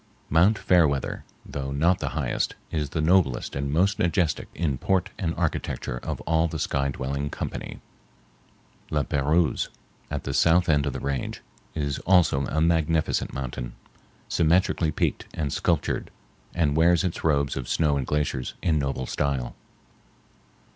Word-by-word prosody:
Mt. 90 +8 +5
Fairweather, 80 -9 +2 0.2
though 70 -1 -5
not 85 +6 +2
the - - -2
highest, - - -1 0.2
is 75 -3 -1
the 80 - -2
noblest 80 -6 +2
and 70 0 -2
most 95 +6 +2
majestic 85 -1 +1
in 75 -7 -1
port 95 -2 +1
and 85 -3 -1
architecture 75 -6 -2
of - - -4
all 80 +1 +2
the 80 - -4
sky 70 -1 0
dwelling 70 +2 -3
company. - - -5 1.1
La 75 -1 +1
Pérouse, 75 +3 +1 0.4
at - - -3
the 70 - -3
south 85 +4 +4
end 75 -2 +3
of 70 - -2
the - - -4
range, 70 -2 -3 0.3
is 70 -3 -2
also 85 -7 +3
a 80 - -1
magnificent 80 -1 +1
mountain, - - -5 0.5
symmetrically 85 0 +2
peaked - - -1
and 75 -3 -2
sculptured, - - 0 0.5
and 75 -5 +2
wears 85 +2 +4
its 90 -3 -3
robes 70 -3 +2
of 65 -3 -5
snow 75 -3 +2
and 65 -3 -2
glaciers 75 -4 -1
in 80 -3 +2
noble 70 -2 -2
style. 70 -2 -1
75 Hz, 145 wpm, -26 LUFS, 70-85 Hz, 1.1 s, Mt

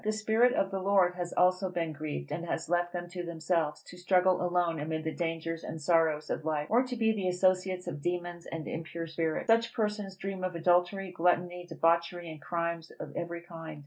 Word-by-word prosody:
The 215 - +1
Spirit 220 +3 +3
of 195 - +1
the 195 - -1
Lord 190 -2 +3
has 175 -1 -4
also 185 +1 +3
been 165 -3 -2
grieved, 150 - -5
and 170 - -3
has 165 - -2
left 175 0 +1
them 175 0 -4
to 175 0 -5
themselves, 160 -2 -1
to 180 - -12
struggle 180 0 +3
alone 175 -2 +1
amid 160 +1 -2
the 160 0 -2
dangers 165 -1 -3
and 160 - -5
sorrows 155 -1 +2
of - - -2
life; 150 -1 0
or 235 +3 +6
to 255 -1 -3
be 225 -1 +3
the 200 -4 -1
associates 185 0 +2
of 155 -5 -5
demons 175 +1 -3
and 160 -2 -5
impure 165 +1 -4
spirits. 160 -1 -1
Such 230 0 +3
persons 210 -3 -2
dream 195 -1 -4
of 185 -1 -2
adultery, 180 +3 +2
gluttony, 175 0 +1
debauchery, 170 +1 +1
and 155 -2 -10
crimes 170 +1 -2
of - - -7
every 170 0 -4
kind. 165 -3 -9
175 Hz, 205 wpm, -31 LUFS, 165-185 Hz, -, or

